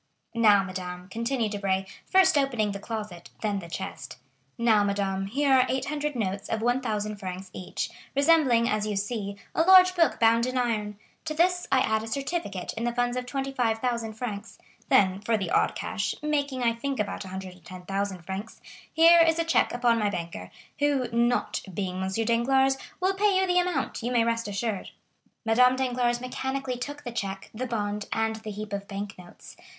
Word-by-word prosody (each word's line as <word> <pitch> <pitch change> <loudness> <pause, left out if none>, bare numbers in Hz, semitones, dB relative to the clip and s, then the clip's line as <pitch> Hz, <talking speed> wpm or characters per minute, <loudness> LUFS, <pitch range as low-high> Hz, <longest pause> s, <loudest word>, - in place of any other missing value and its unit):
"Now, 210 -4 +5
madame," 180 -1 -6
continued 230 +1 -1
Debray, 195 -2 -1 0.2
first 380 -3 +5
opening 245 -7 +1
the 200 - -5
closet, 210 -5 -6
then 205 -2 0
the 170 -3 -10
chest;—"now, 150 - -2
madame, 195 -1 -1
here 275 +6 +2
are 255 -1 +6
800 295 +2 -2
notes 195 -4 -3
of 220 0 -1
1,000 220 -4 -1
francs 185 -1 -7
each, 185 - -4 0.2
resembling, 280 -5 +4
as 215 -1 0
you 210 - -2
see, 200 0 -3 0.2
a - - +2
large 370 +1 +7
book 335 -2 +2
bound 230 +1 +4
in 255 0 -2
iron; 215 -4 -1 0.3
to 310 -1 -3
this 355 +2 +2
I - - +4
add 220 0 +1
a 225 - -7
certificate 270 - -3
in 230 - -4
the 240 0 -1
funds 245 0 0
of 250 0 -3
25,000 245 -4 -1
francs; 220 -2 -6 0.3
then, 190 0 +4
for 225 +2 +1
the 190 -5 -3
odd - - +2
cash, 210 +1 -2
making 285 -4 -1
I 230 -1 +3
think 265 +2 -4
about 205 -1 -2
110,000 185 0 -5
francs, 195 +5 -6 0.3
here 335 +1 +7
is 325 0 +4
a 335 - +2
check 330 - +2
upon 240 -1 +2
my 210 -1 +1
banker, 170 - -5 0.3
who, 285 -4 +1
not 235 +1 +1
being 185 0 -3
M. 190 - -1
Danglars, 235 +6 +2 0.2
will 375 +1 +2
pay 395 -1 +2
you 380 - +3
the 360 -1 +3
amount, 360 -6 -1
you 240 +2 -2
may 240 -2 +3
rest 230 -1 -1
assured." 205 0 -3 0.6
Madame 250 +3 +5
Danglars 245 -2 0
mechanically 260 0 -3
took 290 +3 -6
the 240 - -5
check, 195 -4 -5
the 250 +4 -4
bond, 210 -3 -3
and 225 0 0
the 220 0 -8
heap 210 0 -6
of 200 0 -4
bank 200 +1 -5
notes. 175 -1 -13
230 Hz, 175 wpm, -27 LUFS, 200-260 Hz, 0.6 s, large